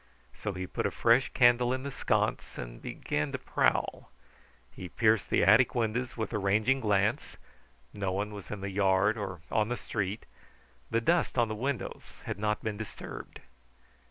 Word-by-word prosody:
So 105 - -4
he 95 0 -4
put - - -2
a - - -1
fresh 120 +3 +3
candle 120 0 +4
in 130 0 -2
the 140 - -4
sconce - - -1
and - - -7
began 75 -1 -2
to - - 0
prowl. - - 0 0.6
He 90 - -8
pierced 110 0 +2
the - - +3
attic 110 +9 +5
windows 120 +2 -1
with 110 +1 -3
a 105 - 0
ranging 110 +7 +2
glance; 105 -1 0 0.6
no 100 -2 -2
one 105 +3 -2
was 100 -2 -9
in 105 -2 -5
the 100 0 -4
yard 95 +2 +3
or 95 -6 -5
on 110 -1 +2
the 125 - -1
Street. 105 0 -3 0.6
The 115 +1 +1
dust 170 +2 +1
on 120 -2 +3
the - - -2
windows 130 +1 -3 0.2
had - - -4
not 105 0 -1
been 110 -2 -2
disturbed. 110 -2 -8
105 Hz, 175 wpm, -30 LUFS, 100-120 Hz, 0.6 s, attic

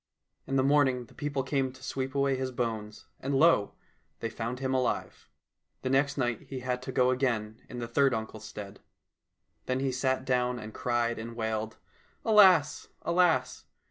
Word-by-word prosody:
In 135 - -1
the 130 - +3
morning 135 -3 +3
the - - -20
people 145 -2 -2
came 135 -1 0
to 130 0 -16
sweep 130 +1 -3
away 140 -1 +2
his 130 0 -2
bones, 110 -4 -4
and 140 +1 -2
lo! 135 -8 +4 0.4
they 115 - -3
found 115 +2 -4
him 130 0 -2
alive. 130 -2 -2 0.5
The 130 - -1
next 140 +2 +2
night 120 -4 0
he 130 -2 -5
had 125 0 -2
to 130 - -5
go 125 0 +3
again 115 -4 -1
in 125 - -7
the 120 -1 -4
third 135 +3 +3
uncle's 110 -2 -4
stead. 100 -2 -8 0.9
Then 130 0 0
he 135 0 0
sat 130 0 0
down 125 -1 +1
and 110 -2 -8
cried 120 -1 0
and 115 +1 -7
wailed, 110 -1 -3 0.3
" - - -36
Alas, 185 -9 +5 0.2
alas 165 -8 +2
130 Hz, 175 wpm, -29 LUFS, 115-135 Hz, 0.9 s, Alas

